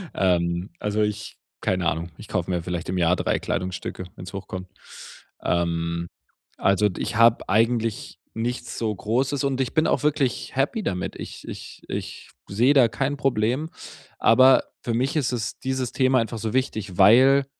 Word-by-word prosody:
Ähm, 85 Hz, -1 st, +1 dB
also 105 Hz, +1 st, 0 dB
ich 105 Hz, 0 st, -3 dB, 0.3 s
keine 90 Hz, -2 st, 0 dB
Ahnung, 85 Hz, +1 st, -2 dB
ich 105 Hz, -, -11 dB
kaufe 90 Hz, 0 st, -2 dB
mir 90 Hz, -2 st, -1 dB
vielleicht 85 Hz, -1 st, -4 dB
im 95 Hz, -, -1 dB
Jahr 90 Hz, +1 st, +3 dB
3 -, -, 0 dB
Kleidungsstücke, 90 Hz, 0 st, -4 dB
wenn's 90 Hz, -, -9 dB
hochkommt. 95 Hz, -1 st, -6 dB, 0.7 s
Ähm, 85 Hz, 0 st, -1 dB, 0.5 s
also 100 Hz, +2 st, +3 dB
ich -, -, -3 dB
habe 115 Hz, 0 st, +5 dB
eigentlich 115 Hz, +1 st, 0 dB, 0.2 s
nichts 120 Hz, +1 st, -3 dB
so 110 Hz, -2 st, -1 dB
großes 130 Hz, +7 st, -1 dB
und 135 Hz, -1 st, 0 dB
ich 130 Hz, +1 st, -1 dB
bin 155 Hz, 0 st, +3 dB
auch -, -, +1 dB
wirklich 140 Hz, -5 st, 0 dB
happy 145 Hz, -, 0 dB
damit. 90 Hz, -2 st, -3 dB
Ich -, -, -9 dB
ich -, -, -9 dB
ich -, -, -6 dB, 0.2 s
sehe 120 Hz, +8 st, +3 dB
da 125 Hz, -4 st, +6 dB
kein 135 Hz, +5 st, -2 dB
Problem, 130 Hz, +4 st, 0 dB, 0.5 s
aber 130 Hz, +3 st, +6 dB, 0.2 s
für 120 Hz, -, -2 dB
mich 130 Hz, +6 st, 0 dB
ist 140 Hz, -5 st, +1 dB
es 115 Hz, -3 st, -3 dB
dieses 130 Hz, -2 st, -2 dB
Thema 130 Hz, -1 st, +3 dB
einfach 115 Hz, 0 st, -3 dB
so 110 Hz, 0 st, -3 dB
wichtig, 110 Hz, -8 st, -2 dB
weil 130 Hz, +7 st, +6 dB
110 Hz, 165 wpm, -24 LUFS, 95-130 Hz, 0.7 s, da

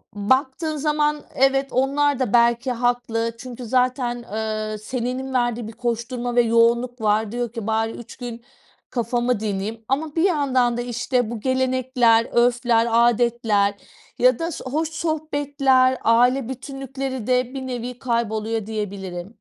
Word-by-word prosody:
baktığın 265 Hz, +8 st, 0 dB
zaman, 300 Hz, 0 st, +1 dB
evet, 270 Hz, +1 st, +3 dB
onlar 280 Hz, +1 st, +1 dB
da 245 Hz, -4 st, -1 dB
belki 235 Hz, +2 st, +3 dB
haklı. 240 Hz, -1 st, 0 dB
Çünkü 250 Hz, 0 st, -8 dB
zaten, 250 Hz, 0 st, 0 dB
ııı, 215 Hz, 0 st, -3 dB
senenin 255 Hz, +3 st, -4 dB
verdiği 240 Hz, -2 st, 0 dB
bir 225 Hz, -, -8 dB
koşturma 240 Hz, +1 st, -3 dB
ve 240 Hz, -, +6 dB
yoğunluk 235 Hz, +1 st, +2 dB
var. 215 Hz, 0 st, +1 dB
Diyor 240 Hz, -1 st, -3 dB
ki, 225 Hz, -3 st, -5 dB
"Bari 225 Hz, 0 st, 0 dB
3 240 Hz, -, -10 dB
gün 235 Hz, -2 st, -7 dB, 0.5 s
kafamı 240 Hz, -1 st, 0 dB
dinleyeyim." 215 Hz, +1 st, -3 dB
ama 295 Hz, +3 st, -1 dB
bir 325 Hz, -, +2 dB
yandan 260 Hz, -9 st, +2 dB
da, -, -, -1 dB
işte, 245 Hz, -1 st, -1 dB
bu 230 Hz, -, -4 dB
gelenekler, 255 Hz, -2 st, +2 dB
örfler, 240 Hz, -1 st, +3 dB
âdetler 230 Hz, -3 st, +3 dB, 0.5 s
ya 250 Hz, -1 st, +4 dB
da 335 Hz, +1 st, -2 dB
s -, -, -7 dB
hoş 310 Hz, +5 st, -1 dB
sohbetler, 285 Hz, -5 st, +1 dB
aile 245 Hz, +2 st, +3 dB
bütünlükleri 265 Hz, -2 st, -5 dB
de 250 Hz, 0 st, +1 dB
bir 265 Hz, -1 st, -5 dB
nevi 245 Hz, 0 st, -5 dB
kayboluyor, 225 Hz, -3 st, -1 dB
diyebilirim. 200 Hz, -2 st, -5 dB
245 Hz, 140 wpm, -22 LUFS, 230-260 Hz, 0.5 s, ve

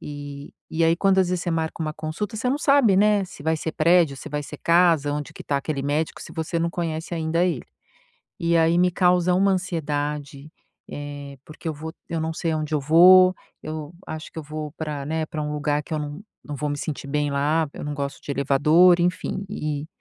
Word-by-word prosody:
E 145 Hz, -1 st, -8 dB, 0.2 s
e 165 Hz, +1 st, +1 dB
aí, 165 Hz, +1 st, +4 dB
quando 195 Hz, 0 st, +3 dB
às 185 Hz, -2 st, +3 dB
vezes 180 Hz, -2 st, 0 dB
você 175 Hz, -, -2 dB
marca 160 Hz, 0 st, -2 dB
uma 155 Hz, -1 st, -2 dB
consulta, 160 Hz, +8 st, -4 dB
você 250 Hz, +4 st, -1 dB
não 280 Hz, -, 0 dB
sabe, 275 Hz, -, +4 dB
né, 205 Hz, -1 st, +4 dB
se 180 Hz, -6 st, -12 dB
vai 160 Hz, +1 st, +1 dB
ser 160 Hz, +1 st, -4 dB
prédio, 165 Hz, -3 st, +3 dB
se 155 Hz, -, -8 dB
vai 150 Hz, 0 st, -3 dB
ser -, -, -9 dB
casa, 165 Hz, -4 st, +3 dB
onde 150 Hz, -1 st, -4 dB
que -, -, -10 dB
tá 140 Hz, -, 0 dB
aquele 140 Hz, -1 st, -3 dB
médico, 150 Hz, +3 st, -1 dB
se -, -, -10 dB
você 160 Hz, +1 st, -2 dB
não 170 Hz, +1 st, 0 dB
conhece 165 Hz, -1 st, -3 dB
ainda 165 Hz, +1 st, +1 dB
ele. 165 Hz, -9 st, -1 dB, 0.8 s
E 170 Hz, 0 st, +2 dB
aí 165 Hz, +1 st, +4 dB
me 180 Hz, 0 st, +4 dB
causa 180 Hz, 0 st, +3 dB
uma 195 Hz, +1 st, +3 dB
ansiedade, 150 Hz, -5 st, -3 dB, 0.4 s
eh, 145 Hz, -1 st, -7 dB
porque 160 Hz, +2 st, -8 dB
eu 155 Hz, -, -2 dB
vou 160 Hz, +2 st, -7 dB, 0.2 s
eu 165 Hz, -1 st, -2 dB
não 160 Hz, 0 st, -2 dB
sei 165 Hz, -1 st, -1 dB
aonde 155 Hz, 0 st, -2 dB
eu 150 Hz, -, +1 dB
vou. 185 Hz, +5 st, +7 dB, 0.3 s
Eu 155 Hz, +1 st, -6 dB
acho 155 Hz, 0 st, -7 dB
que -, -, -7 dB
eu -, -, -5 dB
vou 150 Hz, 0 st, -6 dB
pra, 150 Hz, -3 st, -4 dB
né, 160 Hz, 0 st, -1 dB
pra 155 Hz, -1 st, -4 dB
um 150 Hz, 0 st, -3 dB
lugar 150 Hz, 0 st, 0 dB
que 155 Hz, -, -11 dB
eu -, -, -1 dB
não 150 Hz, +5 st, -6 dB, 0.2 s
não 145 Hz, -1 st, -6 dB
vou 150 Hz, +2 st, -2 dB
me 145 Hz, -, -2 dB
sentir 145 Hz, -1 st, -5 dB
bem 145 Hz, 0 st, 0 dB
lá. 150 Hz, +3 st, +1 dB
Eu -, -, -7 dB
não 145 Hz, 0 st, -3 dB
gosto 140 Hz, 0 st, -4 dB
de -, -, -7 dB
elevador, 150 Hz, +6 st, +4 dB
enfim, 180 Hz, +2 st, -1 dB
e 150 Hz, -6 st, -3 dB
160 Hz, 225 wpm, -24 LUFS, 145-175 Hz, 0.8 s, vou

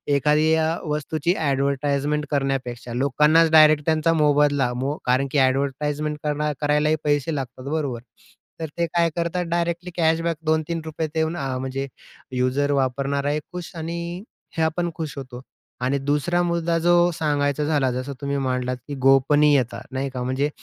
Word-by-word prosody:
एखादी 150 Hz, +3 st, +3 dB
अ, 160 Hz, 0 st, +2 dB, 0.2 s
वस्तूची 155 Hz, +2 st, -1 dB
अ‍ॅडव्हरटाइजमेंट 140 Hz, 0 st, 0 dB
करण्यापेक्षा 130 Hz, -4 st, -2 dB
लोकांनाच 150 Hz, +5 st, +3 dB
डायरेक्ट 155 Hz, -2 st, +6 dB
त्यांचा 160 Hz, +1 st, +2 dB
मोबदला 145 Hz, -4 st, +3 dB
मो 135 Hz, +4 st, -2 dB
कारण 130 Hz, +2 st, +2 dB
की 145 Hz, -, 0 dB
अ‍ॅडव्हरटाइजमेंट 140 Hz, +3 st, 0 dB
करणा 150 Hz, 0 st, 0 dB
करायलाही 150 Hz, +1 st, +2 dB
पैसे 145 Hz, +1 st, 0 dB
लागतात 130 Hz, -2 st, -6 dB
बरोबर? 140 Hz, -7 st, -2 dB, 0.6 s
तर 160 Hz, -, -3 dB
ते 170 Hz, -, +2 dB
काय 170 Hz, 0 st, +1 dB
करतात 170 Hz, +1 st, -1 dB
डायरेक्टली 170 Hz, +1 st, -2 dB
कॅशबॅक 165 Hz, 0 st, +1 dB
₹2-3 160 Hz, 0 st, -1 dB
देऊन 160 Hz, +2 st, 0 dB
अ, 135 Hz, -2 st, -2 dB
म्हणजे 135 Hz, +1 st, -3 dB, 0.4 s
युजर 130 Hz, +3 st, 0 dB
वापरणाराही 140 Hz, +2 st, 0 dB
खुश 180 Hz, -2 st, -6 dB
आणि 170 Hz, +3 st, -5 dB, 0.3 s
हे 160 Hz, -, +2 dB
आपण 170 Hz, +2 st, 0 dB
खुश 155 Hz, -3 st, -5 dB
होतो. 130 Hz, -2 st, -8 dB, 0.4 s
आणि 130 Hz, +3 st, +1 dB
दुसरा 150 Hz, +5 st, 0 dB
मुद्दा 170 Hz, -1 st, 0 dB
जो 175 Hz, 0 st, +4 dB, 0.2 s
सांगायचा 145 Hz, -2 st, 0 dB
झाला 145 Hz, -4 st, +1 dB
जसं 130 Hz, +3 st, -4 dB
तुम्ही 140 Hz, 0 st, -1 dB
मांडलात, 125 Hz, 0 st, -1 dB
की 145 Hz, -, -5 dB
गोपनीयता, 135 Hz, 0 st, +4 dB
नाही 135 Hz, +1 st, -2 dB
का, 125 Hz, -1 st, -5 dB
म्हणजे 130 Hz, +3 st, 0 dB
150 Hz, 145 wpm, -23 LUFS, 135-160 Hz, 0.6 s, डायरेक्ट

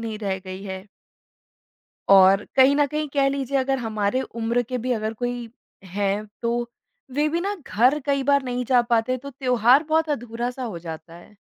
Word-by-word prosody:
नहीं 220 Hz, -2 st, -5 dB
रह 195 Hz, -3 st, -2 dB
गई 185 Hz, +1 st, -7 dB
है? 190 Hz, 0 st, -7 dB, 1.2 s
और 195 Hz, +1 st, +7 dB
कहीं 270 Hz, +1 st, +6 dB
न 290 Hz, 0 st, +3 dB
कहीं 305 Hz, +2 st, -3 dB
कह 275 Hz, -1 st, +3 dB
लीजिए 275 Hz, 0 st, -1 dB
अगर 270 Hz, 0 st, 0 dB
हमारे 220 Hz, 0 st, -1 dB, 0.2 s
उम्र 235 Hz, +2 st, +1 dB
के 250 Hz, +2 st, -4 dB
भी 255 Hz, -, -1 dB
अगर 220 Hz, 0 st, -2 dB
कोई 245 Hz, 0 st, -4 dB, 0.4 s
हैं 200 Hz, +2 st, -2 dB, 0.2 s
तो, 235 Hz, 0 st, -2 dB, 0.4 s
वे 295 Hz, +3 st, +1 dB
भी 335 Hz, -, -1 dB
ना 405 Hz, +2 st, -2 dB
घर 255 Hz, +7 st, +3 dB
कई 275 Hz, -1 st, +1 dB
बार 280 Hz, 0 st, +3 dB
नहीं 250 Hz, 0 st, -2 dB
जा 245 Hz, 0 st, +4 dB
पाते 235 Hz, +3 st, +2 dB
तो 280 Hz, +3 st, -9 dB
त्योहार 250 Hz, +1 st, +3 dB
बहुत 320 Hz, 0 st, +2 dB
अधूरा 240 Hz, -3 st, -3 dB
सा 255 Hz, +1 st, -7 dB
हो 210 Hz, -9 st, -5 dB
जाता 165 Hz, 0 st, -9 dB
है। 175 Hz, +4 st, -16 dB
245 Hz, 190 wpm, -23 LUFS, 210-270 Hz, 1.2 s, और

